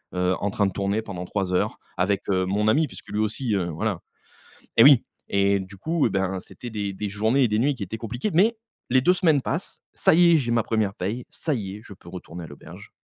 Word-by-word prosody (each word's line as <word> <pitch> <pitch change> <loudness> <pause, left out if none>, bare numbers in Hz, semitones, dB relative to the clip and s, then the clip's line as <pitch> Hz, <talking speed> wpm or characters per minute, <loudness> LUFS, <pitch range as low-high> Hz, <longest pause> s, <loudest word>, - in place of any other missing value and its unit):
heu, 90 +1 +1
en 100 - -1
train 100 +1 +1
de 95 - 0
tourner 100 +3 -1
pendant 90 -4 -6
3 95 -1 -2
heures 90 - 0 0.2
avec, 95 +2 0
heu, 95 -1 +2
mon 105 +3 0
ami 150 +7 +3
puisque - - -11
lui 105 - -2
aussi, 110 +2 0
heu, 90 -3 0
voilà. 90 +3 -2 0.8
Et 115 - +9
oui, 140 -4 +8 0.2
et 100 0 +2
du 95 +1 -9
coup, 160 - +1
ben, 95 -1 -1
c'était 120 +6 -10
des 100 -3 -3
des 100 +1 -4
journées 110 +7 +1
et - - +4
des 105 0 0
nuits 140 +5 +2
qui 120 - -12
étaient 110 +4 -5
compliquées 120 - -3
mais 215 +7 +4 0.4
les 130 0 +5
2 180 +6 +4
semaines 160 -7 +3
passent, - - -4
ça - - +4
y 170 0 +6
est, - - +6
j'ai 120 -5 -1
ma 115 -1 +3
1re 110 -3 0
paye, 105 +8 -4
ça 155 -4 -2
y 100 -2 -5
est, - - -13
je 100 - -11
peux 85 - -15
retourner 90 -1 -8
à - - -8
l'auberge. 70 - -12
105 Hz, 245 wpm, -24 LUFS, 95-125 Hz, 0.8 s, Et